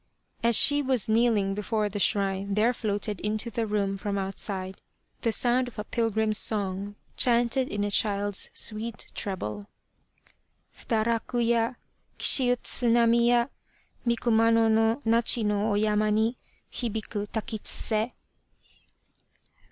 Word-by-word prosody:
As 235 -1 +4
she 290 0 +6
was 260 -5 +1
kneeling 220 -3 +2
before 210 +1 -2
the 205 0 -5
shrine 195 0 0
there 225 +4 +2
floated 205 -3 -3
into 215 +3 -2
the 225 +1 -2
room 200 -2 -1
from 200 -1 -3
outside 190 -1 -4 0.4
the 230 - 0
sound 245 +2 +2
of 245 - -12
a. 210 - -3
pilgrim's 220 -1 0
song 200 -1 -1 0.2
chanted 245 +2 +2
in 205 0 -2
a 205 - -2
child's 205 -1 +1
sweet 220 0 -2
treble. 105 - -5 1.1
Fudaraku 230 +2 -2
ya! 235 +1 +1 0.4
Kishi 255 -3 +5
utsu 245 0 0
nami 235 0 +3
ya 240 -1 +3 0.6
Mi 235 -1 +1
Kumano 230 -1 +3
no 225 +5 +1
Nachi 230 0 +2
no 210 +1 0
oyama 210 +1 +1
ni 220 +3 +1 0.4
Hibiku 220 -3 -4
takitsuse. 220 +1 -3
220 Hz, 125 wpm, -26 LUFS, 205-235 Hz, 1.1 s, she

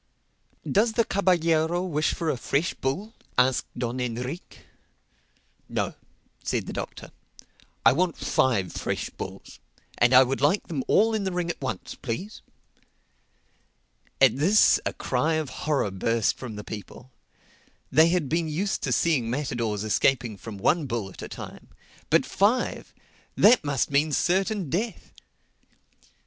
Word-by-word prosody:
"Does 220 +3 +2
the 230 0 +2
caballero 175 -3 +2
wish 155 -4 0
for 165 -2 -1
a - - -2
fresh 140 +6 -1
bull?" 190 +12 -3 0.2
asked 125 0 +3
Don 120 +1 -3
Enrique. 125 +6 -5 1.1
"No," - - -2 0.5
said - - -1
the - - -6
Doctor, - - -6 0.7
"I 115 - +8
want 175 +2 0
five 100 -9 +1
fresh - - -3
bulls. - - -9 0.4
And 120 +1 +5
I 130 - +9
would 135 +1 -2
like 150 +8 +2
them 150 -7 -3
all 225 +2 +4
in 215 -2 0
the 190 - -1
ring 175 -1 -1
at - - -11
once, 125 -8 -4
please." 175 - -6 1.8
At 135 -2 +5
this 190 +9 +5
a - - -2
cry 150 +6 0
of 155 -3 -2
horror 145 -9 -1
burst 115 +3 +1
from 120 -5 -7
the 105 - -7
people. 110 +5 -9 0.8
They 160 +1 +6
had 175 -4 +1
been 165 +3 0
used 180 +6 -2
to - - -2
seeing 140 -9 +2
matadors 115 -6 -2
escaping 120 +1 +1
from 100 +2 -9
one 150 - +1
bull 115 -5 -3
at - - -12
a - - -7
time. - - -9 0.4
But - - +4
five!—That 225 +1 +1
must 145 -2 -1
mean 145 +2 +2
certain 190 +3 +1
death. 220 +6 -3
145 Hz, 140 wpm, -26 LUFS, 125-180 Hz, 1.8 s, I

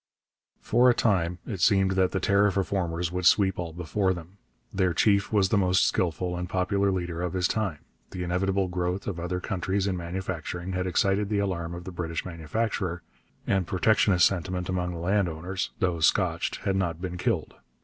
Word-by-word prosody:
For 125 +1 +4
a 120 - +4
time 90 -7 +1
it 100 -7 -5
seemed 95 0 +4
that 95 -1 +2
the 95 - -2
tariff 100 +1 +2
reformers 90 -3 -1
would 90 0 +1
sweep 95 -3 +4
all 85 -2 -3
before 90 +3 -1
them. 90 +3 -11 0.3
Their 95 -3 +1
chief 100 +1 +3
was 100 -3 +3
the 105 - +3
most 95 -1 +3
skilful 90 0 -1
and 90 0 -4
popular 100 +2 +1
leader 85 -3 -2
of 90 -2 -2
his 90 -1 +1
time. 100 -9 -2 0.2
The 90 - -5
inevitable 95 +2 0
growth 90 +1 -2
of 95 -4 -4
other 90 +1 -2
countries 95 0 -1
in 95 -2 0
manufacturing 90 0 -4
had 90 0 -1
excited 100 +3 +1
the 105 - 0
alarm 85 -4 -2
of 85 - -8
the 95 - -7
British 85 -2 -4
manufacturer, 90 +1 -3 0.4
and 95 -3 +1
protectionist 95 -2 +3
sentiment 90 -1 -1
among 90 -1 -1
the - - -6
landowners, 90 0 -1
though 90 -3 0
scotched, 85 +1 +1
had 100 -2 0
not 85 -4 -1
been 90 -1 -5
killed. 100 -7 -1
90 Hz, 180 wpm, -27 LUFS, 85-95 Hz, 0.4 s, For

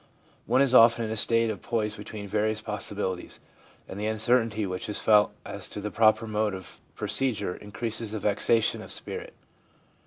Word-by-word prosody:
One 135 - +4
is 130 -2 +1
often 115 -1 +6
in 110 - -4
a - - -1
state 115 +1 +2
of 100 - -7
poise 110 -3 -1
between 105 -1 -8
various 110 +2 0
possibilities, 105 -3 -4 0.5
and 95 - -7
the 105 - -1
uncertainty 110 -1 +1
which 90 +3 -4
is 105 - -2
felt 105 -1 +4
as - - -6
to - - -6
the 105 +1 -4
proper 110 0 +4
mode 105 -2 -1
of 95 -2 -10 0.2
procedure 110 -9 -1
increases 110 +2 -5
the 110 - -4
vexation 105 +2 +1
of - - -9
spirit. - - -5
110 Hz, 175 wpm, -27 LUFS, 105-115 Hz, 0.5 s, often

